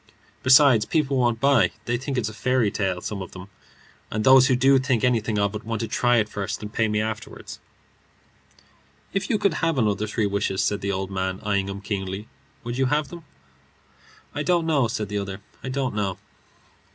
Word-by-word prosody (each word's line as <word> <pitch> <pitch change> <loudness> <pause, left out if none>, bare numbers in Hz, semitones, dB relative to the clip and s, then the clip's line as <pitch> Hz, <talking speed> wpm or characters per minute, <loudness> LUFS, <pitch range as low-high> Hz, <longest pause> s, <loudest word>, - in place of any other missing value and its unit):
Besides, 130 -4 +6
people 140 -4 0
won't 120 -2 +1
buy. 135 -9 +4 0.2
They 120 - 0
think 130 +2 -3
it's 115 -3 0
a 110 - -6
fairy 120 0 +1
tale; 95 -3 -1
some 100 -2 -5
of 90 - -8
them, 95 +1 -10 0.6
and 110 0 -2
those 130 +1 +7
who 130 - +3
do 135 +2 +4
think 130 -4 0
anything 115 -3 +1
of 100 0 +1
it 105 - -6
want 115 -1 -3
to 115 - -2
try 120 +1 +2
it 110 -2 +2
first 100 0 -4
and 105 +1 -7
pay 110 - +1
me 105 0 0
afterward." 110 0 -5 1.6
"If 195 - -2
you 220 - +2
could 200 -4 +1
have 165 -3 +1
another 105 -3 +1
three 105 0 -1
wishes," 100 -1 0
said 105 -1 -1
the 100 - -1
old 95 0 -3
man, 95 0 -2
eyeing 100 -2 0
him 100 0 -6
keenly, 100 0 -4 0.4
"would 120 +2 -4
you 135 - +3
have 150 +1 0
them?" 170 -2 -10 1.1
"I 145 - -3
don't 170 +1 +1
know," 145 -7 +2
said 110 -2 -3
the 105 0 -2
other. 100 0 -5 0.2
"I 130 - -4
don't 130 -1 -2
know." 100 -3 -2
110 Hz, 200 wpm, -24 LUFS, 100-130 Hz, 1.6 s, those